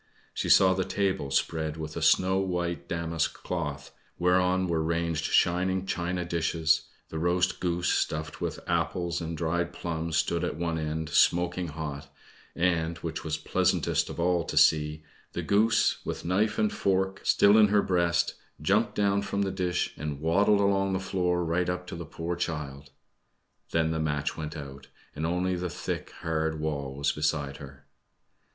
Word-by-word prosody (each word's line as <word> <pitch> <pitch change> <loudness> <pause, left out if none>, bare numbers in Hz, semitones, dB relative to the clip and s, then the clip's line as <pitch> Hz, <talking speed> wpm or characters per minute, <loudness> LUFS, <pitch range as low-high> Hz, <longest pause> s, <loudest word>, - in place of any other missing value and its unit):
She - - -2
saw 95 -1 +7
the 95 0 0
table 95 -8 -1
spread 80 +3 -1
with 80 -1 -6
a - - -3
snow 95 +1 +4
white 90 -2 -2
damask 85 -1 -1
cloth, 75 -5 -4 0.3
whereon 90 +1 +2
were 85 -3 0
ranged 85 -1 -1
shining 95 +2 +2
china 90 -1 -2
dishes; 80 -1 +1 0.2
the 80 - -4
roast 90 +2 +1
goose, 90 0 0
stuffed 75 0 -1
with - - -3
apples 85 0 -1
and 80 0 -4
dried 85 +2 -1
plums, 80 -2 -3
stood 85 +1 0
at - - -2
one 85 0 -2
end, 80 0 -3
smoking 90 +2 +2
hot, 75 -2 -6 0.4
and 85 -1 +1
which 80 -1 -4
was 80 -1 -2
pleasantest - - +1
of - - -7
all 85 0 +2
to - - -5
see 75 0 +4 0.3
the - - -3
goose, 110 +2 +2
with - - -5
knife 105 +5 +1
and 105 -1 +1
fork 95 0 0
still 100 +1 +5
in 110 -1 +7
her 105 0 +3
breast, 85 -3 +1 0.3
jumped 100 +9 +1
down 100 -1 +2
from 100 0 -1
the 95 - -1
dish, 90 -2 -1
and 75 -2 -4
waddled 100 +6 +3
along 95 -1 +2
the 95 - 0
floor 90 -2 0
right 85 +2 0
up 90 0 -3
to - - -7
the 85 0 -6
poor 85 +2 -4
child. 75 -5 -4 0.8
Then 80 -1 +1
the 80 - -1
match 75 -2 -1
went 80 0 -5
out, 70 -2 -9 0.3
and 80 +2 -2
only 90 +2 0
the 90 0 -3
thick, - - -4
hard 80 -1 -1
wall 70 -3 -3
was 70 +1 +1
beside 75 -3 -1
her. 70 -1 -12
85 Hz, 170 wpm, -28 LUFS, 80-90 Hz, 0.8 s, saw